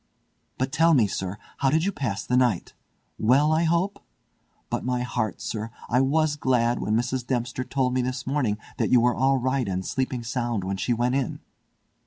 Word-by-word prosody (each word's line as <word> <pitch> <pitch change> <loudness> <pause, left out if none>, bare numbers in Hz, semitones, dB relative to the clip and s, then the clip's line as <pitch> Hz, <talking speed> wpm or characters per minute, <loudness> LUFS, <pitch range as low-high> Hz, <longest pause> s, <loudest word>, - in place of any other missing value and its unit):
But 130 +1 -1
tell 165 +2 +4
me, 120 -5 +5
sir, 95 0 -3 0.2
how 135 - +2
did 160 +4 +2
you 200 - +1
pass 115 - -3
the 125 - 0
night? 125 -8 +1 0.5
Well, 135 +7 +4
I 160 +2 +2
hope? 170 +5 0 0.7
But - - -2
my 125 -1 -1
heart! 115 -4 -2
sir, 110 0 -4 0.2
I 125 +2 +4
was 150 +2 +2
glad 120 -4 +1
when 105 - 0
Mrs. 125 +2 0
Dempster 125 0 -1
told 130 -1 0
me 130 - +2
this 125 0 -3
morning 130 -7 0 0.2
that - - 0
you 125 - +6
were 120 +1 +3
all 135 +2 +2
right 130 -1 0
and 95 0 -2
sleeping 130 -2 -2
sound 120 -3 -2
when 95 +1 -2
she 120 - -1
went 120 +2 +1
in." 135 -3 -1
125 Hz, 195 wpm, -25 LUFS, 115-135 Hz, 0.7 s, you